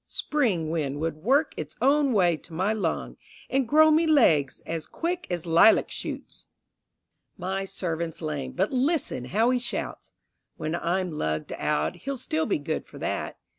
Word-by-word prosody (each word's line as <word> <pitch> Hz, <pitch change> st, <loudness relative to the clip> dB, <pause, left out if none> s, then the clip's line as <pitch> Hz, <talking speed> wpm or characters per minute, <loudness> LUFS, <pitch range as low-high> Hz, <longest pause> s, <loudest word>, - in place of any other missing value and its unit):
Spring 200 Hz, -, 0 dB
wind 145 Hz, -4 st, -2 dB
would 160 Hz, 0 st, -2 dB
work 265 Hz, -, +2 dB
its -, -, -6 dB
own 280 Hz, +3 st, +3 dB
way 180 Hz, -6 st, +3 dB
to 165 Hz, +2 st, -13 dB
my 190 Hz, +6 st, +1 dB
lung, 190 Hz, -7 st, -2 dB, 0.3 s
And 265 Hz, -2 st, +1 dB
grow 310 Hz, +4 st, +6 dB
me 320 Hz, +2 st, +4 dB
legs 160 Hz, -, +4 dB
as 165 Hz, -1 st, -5 dB
quick 345 Hz, +2 st, -3 dB
as 175 Hz, -2 st, -3 dB
lilac 170 Hz, +6 st, +5 dB
shoots. -, -, -7 dB, 0.9 s
My 190 Hz, +2 st, -2 dB
servant's 170 Hz, -3 st, -3 dB
lamed, 145 Hz, -5 st, -4 dB
but 190 Hz, +3 st, +1 dB
listen 265 Hz, -, 0 dB
how 220 Hz, -, +2 dB
he 250 Hz, -, +2 dB
shouts! 240 Hz, -, -4 dB, 0.5 s
When 155 Hz, -, -3 dB
I'm 175 Hz, +1 st, -1 dB
lugged 80 Hz, -, -2 dB
out, 75 Hz, +2 st, -1 dB
he'll 275 Hz, 0 st, -4 dB
still 160 Hz, -9 st, -1 dB
be -, -, +1 dB
good 155 Hz, +2 st, -4 dB
for -, -, -13 dB
that. -, -, -3 dB
180 Hz, 165 wpm, -26 LUFS, 160-255 Hz, 0.9 s, grow